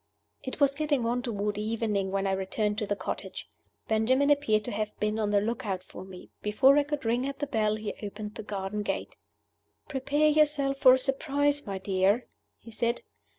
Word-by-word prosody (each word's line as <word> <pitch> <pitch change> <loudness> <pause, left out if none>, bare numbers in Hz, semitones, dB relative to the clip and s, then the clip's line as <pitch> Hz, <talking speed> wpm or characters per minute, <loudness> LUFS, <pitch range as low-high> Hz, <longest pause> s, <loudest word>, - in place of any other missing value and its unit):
It 260 - -6
was 280 -1 +4
getting 290 -4 0
on 240 +2 0
toward 210 -4 -2
evening 215 -3 -1
when 195 0 -1
I 195 - +1
returned 205 +2 -1
to 210 - -2
the 205 - 0
cottage. - - -5 0.4
Benjamin 260 +6 +3
appeared 220 -8 +2
to - - -3
have 210 0 -3
been 210 +1 0
on 210 -1 0
the 205 -1 +4
lookout 205 -4 -2
for 185 - -10
me. 185 -1 -12
Before 260 +7 +5
I - - +3
could 290 -3 -4
ring 240 +4 +1
at 275 0 -5
the 290 - -2
bell 215 -5 +1
he 215 -1 -4
opened 210 0 -6
the 220 - -7
garden 205 0 -4
gate. 205 - -3 0.7
"Prepare 285 +3 +1
yourself 295 -2 +2
for 255 -2 +8
a - - +1
surprise, 285 +1 0
my 195 -1 -3
dear," 195 +4 +1 0.3
he 230 - -13
said. 235 +2 -1
220 Hz, 195 wpm, -28 LUFS, 205-275 Hz, 0.7 s, for